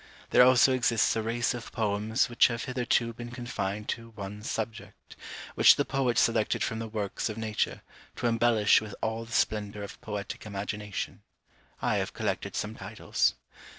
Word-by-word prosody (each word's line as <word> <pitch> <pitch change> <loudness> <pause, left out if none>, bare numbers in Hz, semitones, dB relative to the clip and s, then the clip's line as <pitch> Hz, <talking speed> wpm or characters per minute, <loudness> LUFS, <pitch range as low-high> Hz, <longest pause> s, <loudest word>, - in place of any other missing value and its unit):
There - - +7
also 130 +1 +6
exists 120 -3 +2
a 110 - 0
race 115 +2 0
of 120 -2 -7
poems 110 +2 0
which 120 - +5
have 115 -1 -3
hitherto 125 -2 0
been 120 +1 -8
confined 105 -4 -4
to 115 0 -4
one 105 0 -7
subject, 110 0 -6 0.4
which - - +7
the - - 0
poet 130 -4 0
selected 115 -2 +2
from 110 - -2
the 115 - -4
works 105 0 -3
of 110 - -5
nature, 110 -1 -2 0.3
to - - -4
embellish 115 -3 +4
with 110 -1 -8
all 110 +1 -2
the 115 - -14
splendour 105 -3 0
of 100 - -9
poetic 105 -2 -5
imagination. 105 0 -4 0.6
I - - +2
have - - -2
collected - - -3
some - - -2
titles. - - -1
110 Hz, 165 wpm, -29 LUFS, 105-120 Hz, 0.6 s, There